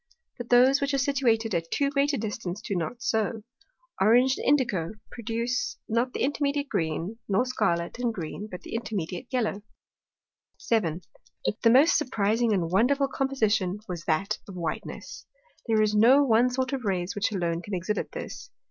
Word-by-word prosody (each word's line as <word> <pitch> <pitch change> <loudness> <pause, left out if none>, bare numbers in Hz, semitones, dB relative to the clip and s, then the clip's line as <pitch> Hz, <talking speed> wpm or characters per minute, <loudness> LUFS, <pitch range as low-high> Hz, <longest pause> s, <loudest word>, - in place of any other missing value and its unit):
But 240 - -6
those, 255 +3 +5
which 280 0 0
are - - +2
situated 245 -5 +1
at 165 -1 -1
too 280 +7 0
great 280 +1 +2
a 280 - -1
distance, 205 -4 -4
do 205 -2 -4
not 180 +8 -3
so. 220 -1 0 0.6
Orange 245 +6 +5
and - - -4
Indico 215 - -2 0.2
produce 235 +2 -2
not 235 +3 0
the - - -4
intermediate 285 +1 0
Green, 165 +7 -2
nor 205 +6 +2
Scarlet 195 -6 -1
and 245 -1 0
Green 205 +2 -6
the 180 - -8
intermediate 220 -2 -4
Yellow. 225 -5 -1 1.0
7. 180 -7 0 0.4
But 210 - -1
the 230 - +5
most 275 +9 +6
surprizing 230 -3 +1
and 175 -5 0
wonderful 275 +8 +3
Composition 215 -9 0
was 175 -3 -6
that 195 +6 0
of 195 - -8
Whiteness. 170 -2 -6 0.4
There 220 -1 +3
is 210 0 +1
no 245 +7 +6
one 240 -1 +4
sort 255 +1 -2
of 265 -2 -2
Rays 185 -3 -1
which 205 +1 -1
alone 170 -4 -1
can 200 +2 -5
exhibit 185 +4 -2
this. - - -7
225 Hz, 165 wpm, -27 LUFS, 190-255 Hz, 1.0 s, most